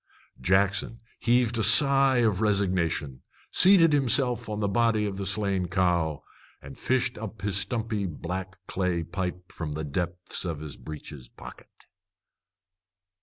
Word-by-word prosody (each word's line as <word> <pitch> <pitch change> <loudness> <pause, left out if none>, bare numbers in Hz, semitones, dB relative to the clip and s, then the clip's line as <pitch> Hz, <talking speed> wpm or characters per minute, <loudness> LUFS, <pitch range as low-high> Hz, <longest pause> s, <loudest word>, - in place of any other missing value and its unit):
Jackson 100 - +1 0.2
heaved 120 -1 +1
a - - +1
sigh 135 +4 +6
of 105 -3 0
resignation, 90 -9 -1 0.3
seated 180 -4 +5
himself 125 -4 +1
on 105 0 -4
the 105 - 0
body 110 +1 +1
of 100 -2 -4
the 100 -1 -1
slain 100 -4 0
cow, 85 -5 -1 0.4
and 70 0 -12
fished 125 -2 -1
up 110 -2 -9
his 100 -1 +1
stumpy 110 -2 -1
black 95 +3 -6
clay 90 -3 -2
pipe 90 +1 -6
from 75 -3 -6
the 80 +1 -5
depths 85 +4 -4
of 85 -5 -4
his 75 -4 -7
breeches 75 -2 -10
pocket. - - -15
100 Hz, 135 wpm, -26 LUFS, 85-115 Hz, 0.4 s, sigh